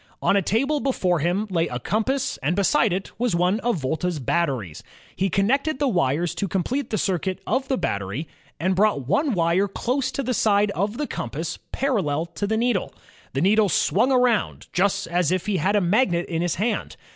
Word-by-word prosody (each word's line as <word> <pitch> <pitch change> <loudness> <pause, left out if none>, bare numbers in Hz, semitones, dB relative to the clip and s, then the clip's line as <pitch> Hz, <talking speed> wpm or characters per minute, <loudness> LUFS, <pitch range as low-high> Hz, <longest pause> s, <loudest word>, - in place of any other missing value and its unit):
On - - +2
a 200 - +4
table 275 - +1
before 185 - 0
him 175 +7 0
lay 165 -2 +1
a 125 - -4
compass 250 - -1
and 150 +6 -1
beside 205 +3 +3
it 185 +2 -3
was 240 -6 +1
one 180 +5 +2
of 240 -1 0
Volta's 160 +5 -2
batteries. 130 - -1 0.3
He 195 +1 0
connected 265 - +1
the 285 0 +1
wires 170 - +1
to 200 - -2
complete 225 +9 -2
the 215 - -1
circuit 190 -1 -1
of 260 +5 0
the 265 - 0
battery, 100 - -3 0.3
and 185 +4 +1
brought 200 -9 +2
one 285 - +1
wire 175 +2 +2
close 255 +6 -1
to 275 - -2
the 255 0 -1
side 205 -2 +2
of 205 +4 -2
the 295 - -1
compass 160 - -5
parallel 180 - 0
to 170 +4 -4
the 220 +1 0
needle. 235 -4 0 0.4
The 135 - -1
needle 205 +3 +4
swung 220 - +2
around, 250 -3 +1
just 200 +2 +1
as 175 -1 0
if 185 -1 0
he 210 -3 0
had 190 +6 +1
a 205 - +3
magnet 180 -2 +2
in 165 -1 -2
his 175 -2 0
hand. 215 +3 -2
195 Hz, 195 wpm, -23 LUFS, 170-235 Hz, 0.4 s, a